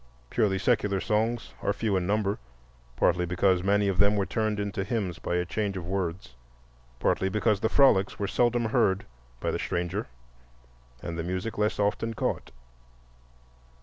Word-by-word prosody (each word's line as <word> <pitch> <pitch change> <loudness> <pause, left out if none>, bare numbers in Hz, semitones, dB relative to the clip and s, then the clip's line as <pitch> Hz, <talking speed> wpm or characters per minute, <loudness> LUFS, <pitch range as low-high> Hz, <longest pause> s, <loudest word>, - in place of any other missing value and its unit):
Purely 105 -5 +2
secular 105 -2 +1
songs 110 +4 -1
are - - +1
few 105 0 -1
in 90 -1 0
number, 105 0 0 0.6
partly 90 +6 +2
because 90 +1 +2
many 100 +2 +2
of 95 -2 -1
them 100 +1 +5
were 100 -1 +1
turned 110 -1 -1
into 100 -1 -2
hymns 100 -4 -2
by 85 - -2
a 90 0 +1
change 100 +2 -2
of 90 - -5
words, 90 -5 -3 0.6
partly 95 +9 +1
because 105 0 +1
the 110 - +1
frolics 115 -9 +4
were 100 - -1
seldom 120 +2 +2
heard 110 -4 +2 0.3
by - - -1
the - - -2
stranger, 90 +3 -2 1.0
and 85 -1 -4
the - - -1
music 95 +5 -3
less 105 0 0
often 110 +2 0
caught. - - -2
100 Hz, 160 wpm, -28 LUFS, 95-110 Hz, 1.0 s, them